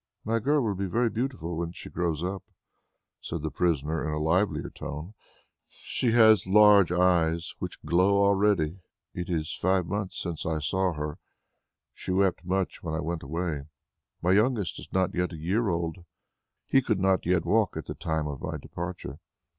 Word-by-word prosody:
"My 115 +1 +1
girl 145 +4 +2
will 105 -3 0
be 95 0 -3
very 115 +5 +1
beautiful 115 -9 -3
when 85 +1 -3
she - - -10
grows 85 -3 -2
up," 95 +1 -3 0.8
said 80 -2 -5
the 80 - -2
prisoner 80 -2 0
in 75 - -2
a 75 - -2
livelier 80 0 +1
tone. 80 +7 -7 0.6
"She 125 - -2
has 110 -5 +6
large 100 -2 +6
eyes, 85 -2 +2
which - - -6
glow 95 +4 +3
already. 100 -4 +2 0.3
It 90 0 -5
is 80 -3 -1
five 95 0 +1
months 100 +2 -3
since 85 -3 -4
I 80 -1 -1
saw 90 +5 0
her; 75 -1 -5 0.7
she - - -9
wept 95 -2 +2
much 95 +1 -1
when 80 -2 -3
I - - -2
went 85 0 -3
away. 80 -1 -3 0.6
My 90 - +3
youngest 105 -1 +2
is - - -12
not 95 -1 +1
yet 90 0 -1
a - - -6
year 100 +8 0
old; 85 0 -2 0.6
he 135 - +4
could 110 -6 0
not 95 -2 +2
yet 90 -2 +2
walk 110 -4 +2
at - - -5
the - - -5
time 80 -1 -2
of 70 -2 -5
my - - -3
departure. 85 -6 -7
90 Hz, 180 wpm, -27 LUFS, 80-100 Hz, 0.8 s, has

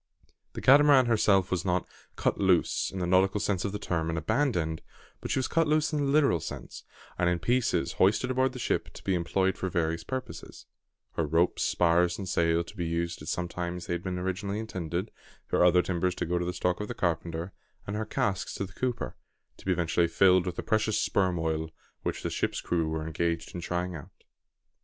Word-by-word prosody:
The - - -6
Catamaran 140 -1 +7
herself 105 -5 +3
was 90 -2 0
not 90 -2 0 0.3
"cut - - 0
loose" 95 -3 +2
in - - -7
the 90 - -1
nautical 95 +3 +3
sense 95 -3 0
of 100 - -1
the 105 - -3
term, 80 -5 -2
and 80 - -2
abandoned, 80 - 0 0.4
but - - -6
she - - 0
was 130 - 0
cut 165 0 +2
loose 155 +1 +2
in 150 - +1
a - - +1
literal 140 - +3
sense, - - -7 0.4
and 90 -1 +3
in 90 - +1
pieces 100 - +1
hoisted 105 +7 +2
aboard 130 0 +1
the - - -7
ship 125 - -1
to - - -12
be 95 - 0
employed 95 +2 0
for 95 - -1
various 80 -2 -1
purposes, 130 -1 -7 0.5
her 80 - +1
ropes, 85 +4 +2
spars, 85 +1 +2
and 95 - -5
sail 85 -1 +2
to 95 - -13
be 85 -4 -2
used 85 0 -2
at - - -9
some 90 0 -1
time 85 0 -4
as 90 -1 -7
they - - -2
had 85 - -2
been 90 0 -3
originally 95 +3 -2
intended 95 -3 -4 0.4
her - - +3
other 90 0 +5
timbers 90 0 -1
to - - -2
go 90 +1 0
to 85 - -2
the 90 - -1
stock 90 +2 -1
of 105 - -4
the - - -5
carpenter, 85 +1 -2 0.3
and 100 - -4
her 110 - -1
casks 100 -2 -2
to 100 - -2
the 95 - -13
cooper, 125 -2 -3 0.4
to - - -16
be - - +3
eventually 85 -1 +2
filled 95 +2 +4
with 90 - -3
the - - -4
precious 110 -1 +1
sperm 95 -3 +1
oil 80 -1 -1 0.3
which - - -3
the - - -2
ship's - - -1
crew 85 -2 -1
were 80 0 -3
engaged 85 +1 -2
in 90 - -5
trying 90 +1 -2
out. 75 - -9
90 Hz, 215 wpm, -28 LUFS, 85-105 Hz, 0.5 s, Catamaran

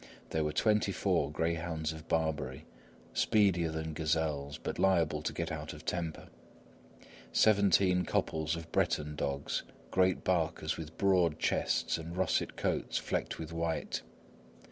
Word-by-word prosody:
There 80 - +1
were 75 - 0
twenty 105 +5 +2
four 90 -7 +1
greyhounds 80 0 -1
of 80 0 -10
Barbary, 75 -5 -1 0.5
speedier 95 -6 +3
than 80 0 -4
gazelles, 75 -2 -1
but - - -5
liable 90 -5 +3
to - - -2
get - - -3
out - - -5
of - - -11
temper; 85 -3 -3 1.0
seventeen 95 -3 +4
couples 80 +1 0
of 80 0 -8
Breton 80 -5 0
dogs, 70 0 -2 0.3
great 95 0 +3
barkers, 80 -3 0
with 80 0 -8
broad 90 -5 +3
chests - - +1
and 85 +2 -7
russet 95 -2 0
coats - - -1
flecked - - -2
with 80 0 -6
white. 80 -1 -2
80 Hz, 135 wpm, -32 LUFS, 80-90 Hz, 1.0 s, seventeen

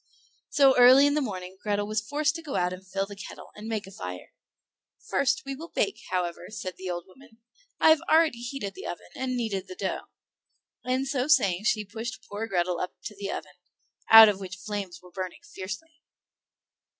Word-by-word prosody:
So 275 -2 +5
early 255 +3 +9
in 285 - +3
the 300 - +1
morning 190 -6 -5
Grethel 205 -1 0
was 215 +1 -1
forced 290 +6 0
to 330 - -6
go 300 -4 -6
out 180 0 +1
and 185 +1 -9
fill 195 +1 -2
the 200 0 -10
kettle, 200 - -10
and 210 +1 -8
make 220 -2 -2
a 195 - -12
fire. 90 - -8 0.7
"First 275 -1 0
we 275 - -3
will 315 +5 -8
bake, 390 - -1
however," 175 -2 -2
said 185 -4 -5
the 190 -1 -6
old 175 -1 -4
woman; 225 +4 -19 0.4
"I - - +6
have 315 -1 +6
already 315 -7 +4
heated 240 -5 -5
the - - -8
oven 175 - -7
and 260 -2 -2
kneaded 200 -5 -2
the 185 - -8
dough"; 190 0 -3 0.8
and 255 +2 0
so 265 -1 0
saying 205 -10 +3
she 215 -1 +2
pushed 225 +3 -6
poor 210 +2 -4
Grethel 180 -3 0
up 180 - -4
to 210 - -7
the 200 0 -5
oven, - - -6 0.6
out 225 0 +12
of 205 -2 +1
which 190 -1 -7
the 185 - -15
flames 195 -5 -5
were 180 - -15
burning 185 -1 -6
fiercely. 320 - -8
210 Hz, 200 wpm, -27 LUFS, 190-265 Hz, 0.8 s, out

